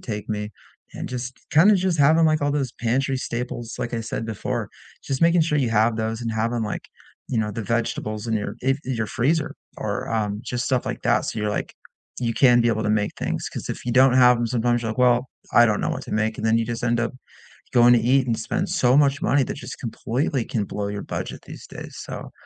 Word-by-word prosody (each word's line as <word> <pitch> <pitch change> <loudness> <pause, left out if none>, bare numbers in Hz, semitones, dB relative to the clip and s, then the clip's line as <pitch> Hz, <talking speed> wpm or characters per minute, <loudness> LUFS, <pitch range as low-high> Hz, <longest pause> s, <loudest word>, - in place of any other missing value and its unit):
take 105 -3 -5
me, 105 -1 -3 0.4
and - - -5
just 125 0 -5
kinda 185 +8 +6
just 185 -2 0
having, 155 +4 +5
like, 155 -1 +2
all 145 - +2
those 135 -4 -1
pantry 130 +3 +1
staples, 120 -1 -4
like 120 -1 -3
I 115 - -1
said 115 0 -4
before, 110 -3 -3 0.4
just 135 +1 -2
making 170 0 +5
sure 150 -2 +1
you 125 -5 +1
have 110 +1 +3
those 110 +1 -2
and 115 -1 -2
having, 115 +1 -1
like, 105 - -4 0.5
you 120 - -1
know, 105 -1 -1
the 115 +2 -4
vegetables 110 -1 -2
in 115 - 0
your 105 -1 -3
if 135 +2 +1
in 130 - -2
your 110 -1 -1
freezer 145 +7 0 0.2
or, - - -3
um, 105 -1 -1
just 120 -1 -2
stuff 130 -2 +1
like - - -4
that, - - +3
so - - -3
you're 105 - 0
like - - -3 0.5
you 115 -1 -1
can 120 -3 +5
be 115 - +2
able 110 -1 0
to 105 - 0
make 105 -1 +1
things, - - -2
'cause - - -7
if - - -5
you 120 - 0
don't 130 0 +6
have 125 -1 +6
'em, 120 0 -1
sometimes 120 0 +1
you're 110 - -2
like, 110 - -6
well, 125 0 +3 0.3
I 120 - +8
don't 105 -2 +1
know - - -1
what - - -4
to - - -7
make, 110 +1 0
and - - -4
then 110 +1 +3
you 115 - -1
just 120 0 -4
end 120 0 +1
up 120 - -1 0.6
going 120 0 +6
to 120 - +5
eat 130 +3 +3
and 115 -2 0
spend 180 - -2
so 135 -8 +3
much 140 -1 +3
money 140 0 +3
that - - -4
just - - -8
completely 125 +2 -2
can 110 - -1
blow 100 0 -4
your 100 0 -4
budget - - -5
these - - -10
days, - - -9
so, - - -7
120 Hz, 245 wpm, -23 LUFS, 110-130 Hz, 0.6 s, I